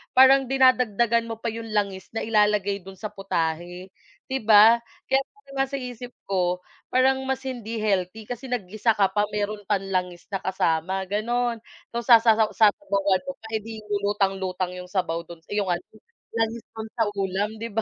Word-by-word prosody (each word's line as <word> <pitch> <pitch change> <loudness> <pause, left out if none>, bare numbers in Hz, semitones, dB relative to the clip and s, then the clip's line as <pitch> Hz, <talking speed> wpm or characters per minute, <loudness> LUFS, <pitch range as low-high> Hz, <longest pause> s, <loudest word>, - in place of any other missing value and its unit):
parang 265 +1 +7
dinadagdagan 240 -3 +3
mo 225 - -3
pa 230 - -2
yung 230 0 -6
langis 200 -3 -1
na - - -1
ilalagay 210 -2 +2
dun 190 +1 -11
sa 215 - -4
putahe, 175 -1 -3 0.4
'di 265 - 0
ba. 220 +2 +8 0.3
Kaya 270 0 +5 0.4
nga 270 - +3
sa 275 - -3
isip 245 0 -7 0.2
ko 180 -2 0 0.3
parang 265 +1 +4
mas 265 0 -1
hindi 230 -4 -4
healthy 200 +1 -1
kasi 245 +1 -5
naggisa 215 -1 0
ka 195 -2 +4
pa 205 0 +2
meron 210 0 -2
pang 200 -2 +2
langis 180 -2 -3
na 195 - 0
kasama 185 0 0
ganon. 235 +3 0 0.4
Tas 235 0 -3
sasaw 225 -2 +6
sasabawan 200 -4 +2
mo 275 - -4
pa, - - -8
eh, - - -5
'di 220 0 -8 0.2
lutang-lutang 190 -2 0
yung 180 0 -8
sabaw 175 -4 -1
dun 170 -1 -11
yung 205 -2 0
ano 175 - -3 0.5
langis 225 0 -1
dun 220 0 -6
sa 230 - +2
ulam 200 +2 -2
di 230 - -3
ba? 225 - +1
210 Hz, 170 wpm, -25 LUFS, 190-235 Hz, 0.5 s, ba